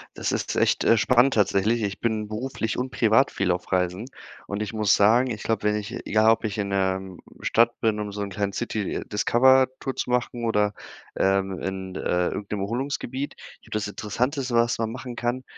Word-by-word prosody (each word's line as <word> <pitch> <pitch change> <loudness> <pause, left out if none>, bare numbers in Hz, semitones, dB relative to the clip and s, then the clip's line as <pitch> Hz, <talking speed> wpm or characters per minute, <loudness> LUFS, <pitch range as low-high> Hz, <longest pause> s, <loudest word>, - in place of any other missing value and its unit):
Das - - -2
ist - - -2
echt, - - +2
äh, 115 - +5
spannend 125 +4 +4
tatsächlich. 105 +2 +2
Ich 100 -1 -3
bin 110 -2 -1
beruflich 115 0 -3
und 125 +1 -2
privat 115 +4 +3
viel 95 -2 0
auf 90 +2 -3
Reisen, 90 +4 0 0.4
und 100 +1 -3
ich 105 - -6
muss 105 -3 +3
sagen, 115 +5 +4
ich 105 - -5
glaube, 110 -2 -1
wenn 105 0 +2
ich 105 -1 -4 0.2
egal, 110 +1 +4
ob 115 - +1
ich 105 -2 -3
in 100 -1 -2
'ner 95 -1 -1 0.2
Stadt 115 +1 +2
bin, 110 -2 +1
um 105 -1 -4
so 105 - -5
'n 100 - -3
kleinen 100 +1 -2
City-Discover-Tour 130 +4 +1
zu - - -3
machen 120 -1 -1
oder, 105 -2 +1 0.4
ähm, 95 -1 +1
in, 95 -1 -5
äh, 90 -1 0
irgend 100 - -6
'nem 105 -2 -2
Erholungsgebiet. 130 +4 -3
Ich - - -15
glaube, - - -8
das 105 -1 -1
Interessanteste, 125 +6 -2
was 115 0 +3
man 115 -1 -1
machen 125 0 -7
kann, 120 +2 -2
110 Hz, 195 wpm, -25 LUFS, 100-120 Hz, 0.4 s, äh